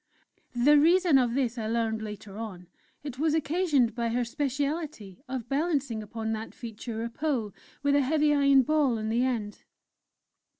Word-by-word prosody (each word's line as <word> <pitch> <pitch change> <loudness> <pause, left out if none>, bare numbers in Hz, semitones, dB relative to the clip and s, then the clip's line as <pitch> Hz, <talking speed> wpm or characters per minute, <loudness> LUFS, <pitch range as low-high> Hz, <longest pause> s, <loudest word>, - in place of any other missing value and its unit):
The 290 +5 +5
reason 335 -1 +5
of 240 -2 +1
this 250 -3 0
I 215 - -3
learned 225 -1 -1
later 210 -2 -8
on; 205 -5 -7 0.4
it 275 -3 -7
was 315 0 +2
occasioned 300 - +1
by 235 0 -1
her 245 +2 0
specialty 280 - -3
of 255 -3 -5
balancing 280 -5 -1
upon 220 +1 -4
that 220 0 -6
feature 225 0 -6
a 235 - -3
pole 245 -7 -2 0.3
with 285 0 +3
a 285 - +4
heavy 300 +2 +2
iron 280 -2 +5
ball 285 -4 +2
on 220 0 -3
the 235 +2 +1
end! 225 -5 -2
250 Hz, 165 wpm, -28 LUFS, 225-290 Hz, 0.4 s, The